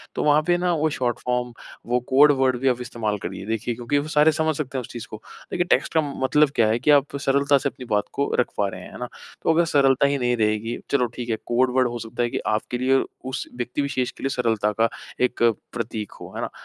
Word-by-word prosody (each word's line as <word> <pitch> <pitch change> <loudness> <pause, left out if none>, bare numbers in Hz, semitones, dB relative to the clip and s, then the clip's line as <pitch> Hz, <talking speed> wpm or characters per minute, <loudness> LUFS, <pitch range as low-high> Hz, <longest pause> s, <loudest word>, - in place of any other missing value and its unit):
तो - - -1
वहाँ 150 +1 +4
पे 175 0 +4
ना 175 0 +1
वो 155 0 +1
शॉर्ट 120 -2 -1
फ़ॉर्म 125 -1 -2 0.4
वो 125 - +3
कोड 145 +3 +7
वर्ड 130 -2 +3
भी 135 - 0
आप 125 -1 +2
इस्तेमाल 110 -3 -2
करिए। 100 - -5
देखिए 115 +2 -2
क्योंकि 120 +5 -1
वो 145 +2 -1
सारे 155 +1 +4
समझ 160 0 0
सकते 135 -3 -3
हैं 130 - -1
उस - - -9
चीज़ 120 -2 -7
को। 110 - -9 0.3
देखिए 175 - 0
टेक्स्ट - - +2
का 160 - +4 0.2
मतलब 150 +2 +4
क्या 110 -2 +4
है 115 +2 +1
कि 150 +4 +3
आप 140 0 +3
सरलता 140 +1 +3
से 140 - -1
अपनी - - -20
अपनी 125 - -9
बात 105 - +2
को 140 - 0
रख 125 - +3
पा 100 - +2
रहे 95 -1 -7
हैं। - - -11
है - - -9
ना? 125 - -4 0.4
तो 165 - +3
अगर 170 +1 +3
सरलता 140 -3 +3
ही 140 0 0
नहीं 125 -1 +1
रहेगी, 110 +1 0
चलो 130 -3 +3
ठीक 120 -1 -5
है 110 - +1
कोड 125 +1 +2
वर्ड 130 -1 +4
हो 120 0 -4
सकता 115 +2 -3
है 120 - 0
कि - - -2
आपके 110 +3 -1
लिए 130 +2 +2 0.2
उस 130 0 -4
व्यक्ति 125 +3 -2
विशेष 130 -3 -1
के - - -14
लिए 135 - +1
सरलता 110 -5 0
का 115 - +5 0.4
एक 125 -1 -2 0.3
प्रतीक 110 -3 -4
हो। - - -9
है - - -3
ना? - - -2
125 Hz, 265 wpm, -23 LUFS, 120-140 Hz, 0.4 s, कोड